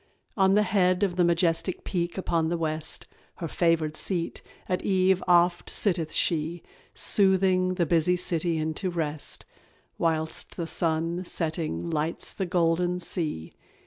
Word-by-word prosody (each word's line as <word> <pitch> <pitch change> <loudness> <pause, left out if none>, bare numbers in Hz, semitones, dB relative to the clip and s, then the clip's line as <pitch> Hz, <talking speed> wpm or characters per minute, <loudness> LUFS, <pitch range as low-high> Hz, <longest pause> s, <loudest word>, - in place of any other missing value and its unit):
On 190 -1 +3
the 210 - +4
head 185 -1 +2
Of 185 -3 0
the 180 - +3
majestic 170 +1 +1
peak 175 -1 -3
upon 165 -3 0
the 170 - -1
west, 155 -1 -2 0.3
Her 170 - -5
favoured 160 -2 +1
seat, 170 0 -2 0.3
at 180 - -1
eve 190 -1 +2
oft 175 0 +3
sitteth 170 -6 +1
she, 165 +1 -1 0.3
Soothing 190 -2 +3
the 175 -2 +1
busy 170 +2 +2
city 170 -1 0
into 160 +4 -2
rest, 155 -4 -4 0.5
Whilst 160 -1 -1
the 170 - -2
sun 165 +2 -1
setting 155 - -3
lights 155 +3 0
the 190 - -3
golden 175 0 +1
sea. 155 - -2
170 Hz, 140 wpm, -26 LUFS, 160-185 Hz, 0.5 s, the